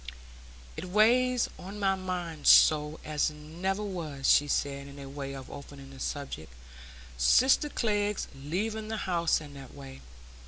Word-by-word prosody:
"It - - -6
weighs 240 +6 +3
on 195 +3 -8
my 195 -1 +2
mind 180 -5 -4
so 150 0 +6
as 150 0 +1
never 170 +7 -4
was," 160 -9 -4
she 145 - +5
said, 140 -1 -2
by 140 -1 -9
way 135 0 -6
of 135 -1 -9
opening 140 -1 -10
the 135 - -12
subject, 135 - -5 0.7
"sister 260 - +4
Glegg's 210 -5 -1
leaving 210 +10 -3
the 220 0 -3
house 170 -3 +1
in 145 -2 -11
that 135 -2 -11
way. 135 -1 -11
155 Hz, 145 wpm, -29 LUFS, 140-200 Hz, 0.7 s, so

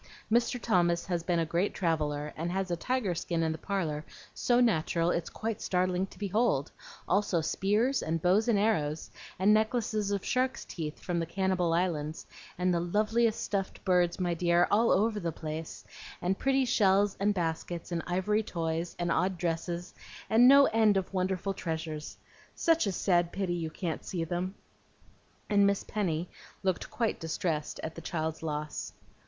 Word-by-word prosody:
Mr. 235 +2 +2
Thomas 175 -7 +2
has 175 -3 -1
been 170 +1 0
a 165 - +1
great 170 +5 0
traveller, 150 -4 -1
and 170 +2 -3
has 190 0 -2
a - - +2
tiger 230 +1 -1
skin 170 0 -1
in 160 - +1
the 160 - -5
parlor 160 -7 -2 0.3
so 245 0 +2
natural 170 -7 +2
it's 170 -2 -2
quite 220 -1 -4
startling 185 0 0
to - - -16
behold; 205 - +1 0.4
also 195 -2 +2
spears, 210 - +1
and 165 +1 -1
bows 190 +7 +3
and 230 -3 +3
arrows, 165 -8 0 0.3
and 195 +3 +4
necklaces 215 -1 +1
of 200 -1 -2
shark's 255 0 0
teeth, 155 -3 -6
from 175 -2 -2
the 165 - -1
Cannibal 185 -1 0
Islands, 165 -3 -1 0.3
and 180 0 +1
the 170 - +2
loveliest 215 +6 +1
stuffed 195 -2 -3
birds, 180 -1 +2
my 175 -2 0
dear, 170 +1 +3
all 225 +3 +4
over 215 +1 +2
the 170 -3 -2
place, 155 0 -6 0.3
and 185 +2 -1
pretty 270 0 +2
shells 200 -3 +3
and 200 +1 +3
baskets, 170 0 -3
and 170 -1 -1
ivory 190 +4 +1
toys, 165 -3 -3
and 175 -1 -1
odd 185 +2 +1
dresses, 170 +1 -3 0.4
and 235 +3 +7
no 280 +1 +8
end 220 -4 +3
of 190 0 -3
wonderful 190 +1 -1
treasures. 160 -3 -5 0.4
Such 330 - +2
a - - +1
sad 175 -2 +1
pity 190 -3 -2
you 165 -2 -2
can't 165 +1 -4
see 175 -3 -3
them!" 180 +3 -3 0.9
and 200 -1 +4
Miss 200 0 +1
Penny 175 -5 -2 0.4
looked 185 -2 -1
quite 240 -7 -1
distressed 160 -1 -2
at 160 - -4
the 165 - -9
child's 160 -2 -3
loss. 150 -1 -4
180 Hz, 170 wpm, -30 LUFS, 165-205 Hz, 0.9 s, no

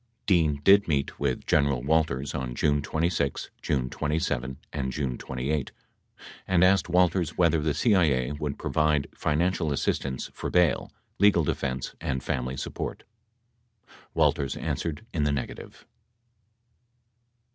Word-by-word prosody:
58 - - -44
Dean 80 -7 +2
did 100 +3 +6
meet 70 -4 -1
with 65 - -1
General 70 -4 +2
Walters 70 -2 +1
on 60 -2 -4
June 75 +3 +2
26, 80 -2 -1
June 65 -3 0
27 65 -3 -2 0.2
and 65 -3 -2
June 65 -2 -2
28 65 +4 -3 0.8
and 90 -1 +3
asked 90 -2 +4
Walters 90 -2 +2
whether 85 -3 +3
the 75 -1 0
CIA 80 - +2
would 75 -1 -4
provide 75 -2 +1
financial 80 +1 0
assistance 70 -1 -2
for - - -4
bail, 90 -4 +2 0.3
legal 100 -4 +5
defense 65 -2 -2
and 65 -1 -2
family 65 +1 -2
support. - - -5 1.1
Walters 70 -2 +1
answered 80 +4 -3
in 75 - 0
the 75 - +2
negative. 70 - -6
75 Hz, 125 wpm, -27 LUFS, 65-85 Hz, 1.1 s, did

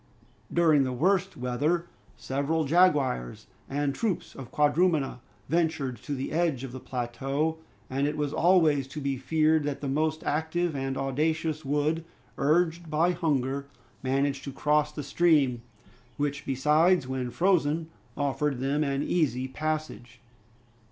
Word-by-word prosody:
During 160 -4 +4
the 130 - -1
worst 190 +8 +1
weather, 145 +8 0 0.3
several 140 +4 -1
jaguars 145 - +2 0.2
and 140 0 0
troops 205 +1 -2
of 130 -3 -9
quadrumana 150 -2 +2 0.3
ventured 160 -5 0
to 145 - -4
the 135 0 -4
edge 160 -6 0
of 135 - -6
the 130 - -7
plateau, 135 +6 -2 0.3
and 135 +4 0
it 150 - -3
was 145 -1 -1
always 160 -6 +3
to 150 +3 -7
be 140 -2 -2
feared 155 +3 +2
that 145 -1 -2
the 145 - -4
most 155 +3 0
active 160 +2 -1
and 135 -1 -2
audacious 155 +3 -1
would, 150 +3 0 0.4
urged 165 +3 +1
by 160 +4 +2
hunger, 140 -5 -1 0.3
manage 135 +1 0
to 140 - -6
cross 150 +2 +1
the 150 -1 -6
stream, 145 -6 +2 0.6
which 145 0 -2
besides, 150 +4 +3
when 130 -1 -3
frozen, 165 +1 +1 0.3
offered 145 0 0
them 140 +3 0
an 140 0 -1
easy 130 -8 0
passage. 140 -5 -4
145 Hz, 140 wpm, -28 LUFS, 135-160 Hz, 0.6 s, During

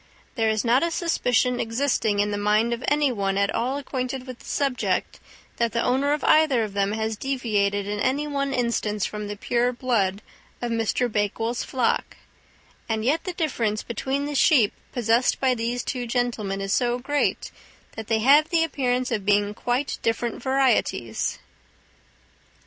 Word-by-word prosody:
There 225 -2 +1
is 220 +1 0
not 245 +3 +4
a 335 - +1
suspicion 250 -7 +1
existing 230 -3 0
in 205 +1 +1
the 205 - -1
mind 215 +3 +2
of 235 +2 -5
any 295 -2 +3
one 195 -4 -1
at 200 0 +1
all 255 +4 -1
acquainted 260 -2 -4
with 255 -2 -9
the - - -16
subject 275 -3 -1 0.4
that 235 -1 0
the 235 - +1
owner 270 +3 +1
of 295 - -1
either 295 -7 +4
of 210 -2 -5
them 200 0 0
has 220 0 -2
deviated 210 -6 -1
in 205 +1 -3
any 275 +7 0
one 280 -1 -1
instance 235 -5 -1
from 210 -1 -5
the 205 0 -6
pure 240 +3 +1
blood 220 -6 0 0.4
of 240 -1 -3
Mr. 230 +2 0
Bakewell's 225 +2 -1
flock, 255 -3 -1 0.7
and 220 0 -1
yet 305 +6 +1
the 365 - -3
difference 235 - -1
between 265 +5 -2
the 295 - -4
sheep 265 -7 +4 0.2
possessed 235 0 +2
by 260 -1 +3
these 240 +1 -2
two 245 -2 -3
gentlemen 225 -5 -1
is 195 0 -1
so 245 -1 +1
great 285 +3 -1 0.4
that 220 -1 -7
they 220 -1 +1
have 290 +6 +5
the 335 -2 +3
appearance 255 -5 -1
of 215 -4 -1
being 205 +1 +2
quite 245 +6 -2
different 230 +1 -1
varieties." 260 - 0
240 Hz, 170 wpm, -24 LUFS, 215-265 Hz, 0.7 s, have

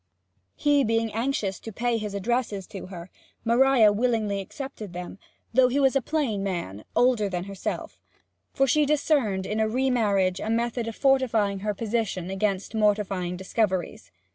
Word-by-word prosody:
He 290 -1 +3
being 225 -1 0
anxious 225 -4 -1
to 225 - -8
pay 235 +2 0
his 210 -2 -5
addresses 210 -1 -1
to 190 -1 -8
her, 180 -1 -9 0.3
Maria 235 -2 +5
willingly 215 -3 0
accepted 215 -2 -7
them, 180 +2 -7 0.3
though 260 -1 +6
he 260 +3 0
was 270 -1 +3
a 275 - +3
plain 260 -8 -1
man, 170 - -4
older 240 -5 +3
than 180 -2 -3
herself; 195 0 -5 0.5
for 270 - +2
she 300 +4 +3
discerned 275 -10 +1
in 210 +2 -2
a 220 - +2
re 260 +3 +1
marriage 200 -6 +2
a 220 - -4
method 235 +1 -1
of 225 - -5
fortifying 230 -8 +2
her 210 +1 -2
position 210 -5 -2
against 195 +1 -1
mortifying 200 -4 0
discoveries. 190 -1 -2
220 Hz, 160 wpm, -26 LUFS, 195-250 Hz, 0.5 s, though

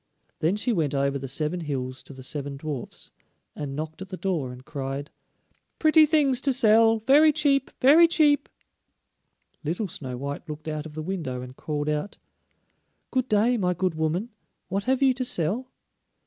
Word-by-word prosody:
Then 165 +5 +1
she 230 +3 -1
went 155 -7 0
over 140 0 0
the 135 - -6
seven 155 +6 -1
hills 130 -5 -4
to - - -11
the 130 -1 -11
seven 140 +1 -4
dwarfs, 145 -4 -7 0.4
and 140 -2 -5
knocked 155 +3 -6
at 190 - -7
the 185 - -6
door 170 -11 -2
and 125 +1 -12
cried: 140 +1 -5 0.7
"Pretty 310 -1 +5
things 285 -5 +3
to 275 - +2
sell, 225 -2 +5
very 280 +8 +5
cheap, 280 -2 +1
very 310 +6 +7
cheap." 300 -3 +3 1.1
Little 175 +7 -2
Snow 130 -7 -5
white 140 +5 -6
looked 150 +1 -7
out 155 0 -4
of 150 - -13
the 155 - -4
window 155 -9 -4
and 125 0 -10
called 150 0 -3
out: 150 +6 -2 0.9
"Good 255 -1 0
day, 220 +4 +3
my 180 -4 0
good 185 0 0
woman, 160 +9 -2 0.4
what 195 +2 -2
have 260 +1 +1
you 265 -1 +5
to 255 0 -3
sell?" 235 +4 -1
170 Hz, 175 wpm, -25 LUFS, -, 1.1 s, very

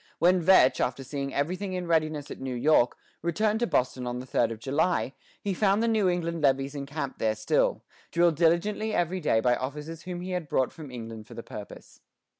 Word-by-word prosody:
When 180 +2 +4
Vetch, 170 -6 +5
after 125 +2 -1
seeing 140 +1 -4
everything 185 +8 -2
in 180 -1 -3
readiness 155 -3 0
at - - -7
New 130 -1 -3
York, 125 -1 +3 0.2
returned 210 +6 +1
to 240 - +1
Boston 125 - 0
on 120 0 -3
the 125 - -6
third 120 -2 +1
of 115 - -5
July, 140 +3 0 0.3
he 200 - 0
found 200 +3 +2
the - - +2
New 215 -4 +3
England 170 -2 -1
levies 135 -1 +2
encamped 140 0 -5
there 110 -1 +1
still, 110 - +1 0.3
drilled 170 -1 +3
diligently 175 +7 +1
every 175 +2 0
day 150 -9 +2
by 125 +1 +3
officers 150 +6 -5
whom 180 -1 -6
he 185 +1 -5
had 180 -5 -3
brought 130 -2 +1
from 155 -4 -9
England 115 -3 -8
for - - -11
the - - -7
purpose. - - -10
155 Hz, 205 wpm, -28 LUFS, 130-180 Hz, 0.3 s, Vetch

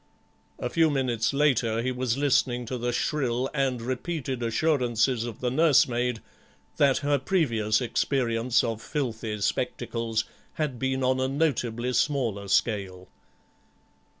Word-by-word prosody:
A - - -3
few 160 +4 +3
minutes 125 -6 0
later 130 -6 +1
he 130 - 0
was 125 -1 -1
listening 125 -3 +1
to 125 +2 -4
the 120 +1 -1
shrill 130 0 -1
and 135 -4 0
repeated 130 0 -3
assurances 120 -2 +1
of 115 -3 -7
the 125 -1 0
nursemaid 125 -5 +2 0.5
that 140 -2 +4
her 145 -1 +2
previous 115 - +1
experience 120 -1 +1
of 115 -1 -3
filthy 115 -7 -3
spectacles 115 +2 -1 0.3
had 145 -6 -3
been 130 0 -1
on 130 0 +2
a 130 - +1
notably 125 -4 -1
smaller 115 -7 0
scale. 95 -3 0
125 Hz, 125 wpm, -26 LUFS, 115-135 Hz, 0.5 s, that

